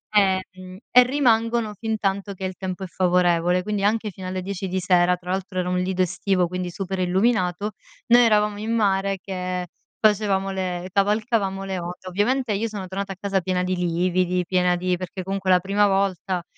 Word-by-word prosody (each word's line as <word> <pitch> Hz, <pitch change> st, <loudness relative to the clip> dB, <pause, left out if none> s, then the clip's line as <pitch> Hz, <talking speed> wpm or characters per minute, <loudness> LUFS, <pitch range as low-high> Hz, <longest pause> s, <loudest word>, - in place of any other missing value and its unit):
ehm, 190 Hz, -2 st, +4 dB
mhmm, 185 Hz, 0 st, -11 dB
e 250 Hz, 0 st, +8 dB
rimangono 235 Hz, -4 st, +1 dB
fintanto 200 Hz, -3 st, -2 dB
che 190 Hz, 0 st, -6 dB
il 185 Hz, -, -4 dB
tempo 190 Hz, 0 st, -5 dB
è -, -, -4 dB
favorevole, 180 Hz, -1 st, +2 dB
quindi 210 Hz, -1 st, -2 dB
anche 215 Hz, +1 st, +1 dB
fino 185 Hz, 0 st, -8 dB
alle 185 Hz, 0 st, -3 dB
10 190 Hz, 0 st, -4 dB
di 190 Hz, +1 st, -1 dB
sera. 180 Hz, -1 st, +3 dB
Tra 180 Hz, +1 st, -4 dB
altro 190 Hz, -1 st, -3 dB
era 180 Hz, -, -1 dB
un 180 Hz, 0 st, 0 dB
lido 185 Hz, 0 st, -1 dB
estivo, 180 Hz, 0 st, 0 dB
quindi 180 Hz, 0 st, -4 dB
super 190 Hz, +1 st, -4 dB
illuminato. 185 Hz, +1 st, +1 dB, 0.4 s
Noi 240 Hz, +1 st, +7 dB
eravamo 210 Hz, -2 st, +3 dB
in 220 Hz, +2 st, -3 dB
mare 195 Hz, -2 st, +1 dB
che 180 Hz, -2 st, -4 dB, 0.3 s
facevamo 200 Hz, -2 st, +2 dB
le 185 Hz, -1 st, -3 dB
cavalcavamo 205 Hz, -1 st, +1 dB
le 190 Hz, -2 st, -3 dB
onde. 175 Hz, +2 st, -7 dB
Ovviamente 230 Hz, +5 st, 0 dB
io 215 Hz, +3 st, -1 dB
sono 200 Hz, -4 st, -6 dB
tornata 195 Hz, +1 st, -4 dB
a 185 Hz, -, -17 dB
casa 195 Hz, -1 st, 0 dB
piena 180 Hz, 0 st, -1 dB
di 185 Hz, 0 st, -1 dB
lividi, 180 Hz, +1 st, +1 dB
piena 180 Hz, 0 st, +2 dB
di 180 Hz, 0 st, -1 dB
perché 185 Hz, +1 st, -6 dB
comunque 195 Hz, 0 st, -3 dB
la 180 Hz, -, +6 dB
prima 200 Hz, +3 st, +2 dB
volta 190 Hz, -2 st, 0 dB
190 Hz, 190 wpm, -23 LUFS, 180-205 Hz, 0.4 s, e